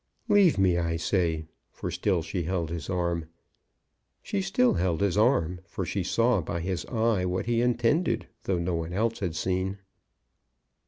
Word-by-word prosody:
"Leave 205 Hz, -, +5 dB
me, 90 Hz, -3 st, +3 dB
I 85 Hz, -1 st, 0 dB
say." 85 Hz, -2 st, 0 dB, 0.2 s
For -, -, -5 dB
still 90 Hz, -5 st, 0 dB
she 85 Hz, +3 st, -3 dB
held 85 Hz, -2 st, -2 dB
his 85 Hz, -3 st, -5 dB
arm. 85 Hz, -3 st, -1 dB, 1.0 s
She 100 Hz, -, -1 dB
still 95 Hz, +6 st, +2 dB
held 85 Hz, -2 st, 0 dB
his 100 Hz, -2 st, +1 dB
arm, 105 Hz, -6 st, +2 dB
for 95 Hz, -, -4 dB
she 95 Hz, +4 st, -2 dB
saw 115 Hz, +3 st, +2 dB
by 85 Hz, +1 st, -3 dB
his 90 Hz, 0 st, -3 dB
eye 115 Hz, -5 st, +1 dB
what 90 Hz, 0 st, -1 dB
he 120 Hz, 0 st, +1 dB
intended, 120 Hz, +2 st, +1 dB, 0.2 s
though 95 Hz, -, +1 dB
no 85 Hz, +1 st, -1 dB
one 85 Hz, +1 st, -3 dB
else 115 Hz, +4 st, 0 dB
had 90 Hz, -6 st, -2 dB
seen. 95 Hz, +3 st, -1 dB
95 Hz, 165 wpm, -27 LUFS, 85-110 Hz, 1.0 s, Leave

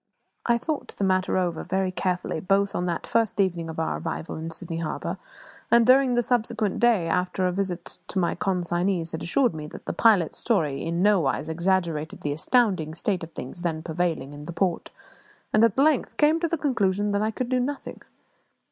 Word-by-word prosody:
I 235 Hz, -1 st, +4 dB
thought 300 Hz, +5 st, -4 dB
the -, -, -1 dB
matter 185 Hz, -1 st, +2 dB
over 175 Hz, -3 st, -1 dB
very 190 Hz, 0 st, -1 dB
carefully, 180 Hz, -3 st, -2 dB
both 195 Hz, +3 st, +1 dB
on 180 Hz, -, -1 dB
that 170 Hz, -1 st, -2 dB
first 225 Hz, -3 st, 0 dB
evening 175 Hz, -4 st, +1 dB
of 160 Hz, -, -5 dB
our 160 Hz, -, -1 dB
arrival 165 Hz, 0 st, -4 dB
in 160 Hz, +1 st, -5 dB
Sydney 165 Hz, 0 st, -4 dB
Harbour, 165 Hz, -, -4 dB, 0.5 s
and 235 Hz, 0 st, +5 dB
during 255 Hz, 0 st, +5 dB
the 240 Hz, -, +3 dB
subsequent 220 Hz, -4 st, 0 dB
day, 230 Hz, -8 st, +3 dB
after 180 Hz, +2 st, 0 dB
a 180 Hz, -, +2 dB
visit 180 Hz, -2 st, -3 dB
to -, -, -5 dB
my 175 Hz, -2 st, +2 dB
consignees 175 Hz, -1 st, -1 dB
had 160 Hz, -, -5 dB
assured 245 Hz, +5 st, +2 dB
me 155 Hz, -1 st, -6 dB
that -, -, -11 dB
the -, -, -3 dB
pilot's 205 Hz, -8 st, +3 dB
story 160 Hz, -, 0 dB
in 170 Hz, +2 st, -1 dB
nowise 180 Hz, -8 st, +2 dB
exaggerated 170 Hz, -2 st, -1 dB
the 145 Hz, -, -1 dB
astounding 180 Hz, -, +1 dB
state 185 Hz, +1 st, -1 dB
of 165 Hz, -, -8 dB
things 130 Hz, +7 st, -7 dB
then 160 Hz, -3 st, -2 dB
prevailing 165 Hz, -4 st, -2 dB
in 145 Hz, 0 st, -9 dB
the 170 Hz, -, -6 dB
port, 175 Hz, 0 st, -1 dB, 0.6 s
and 215 Hz, -, +5 dB
at 230 Hz, -1 st, +3 dB
length 290 Hz, 0 st, +2 dB
came 310 Hz, +2 st, +4 dB
to 335 Hz, -, 0 dB
the 335 Hz, +1 st, -1 dB
conclusion 205 Hz, -8 st, +1 dB
that 200 Hz, 0 st, +1 dB
I 215 Hz, -, +1 dB
could 240 Hz, +2 st, -3 dB
do 255 Hz, -1 st, +2 dB
nothing. 275 Hz, +3 st, -4 dB
185 Hz, 195 wpm, -25 LUFS, 165-225 Hz, 0.6 s, and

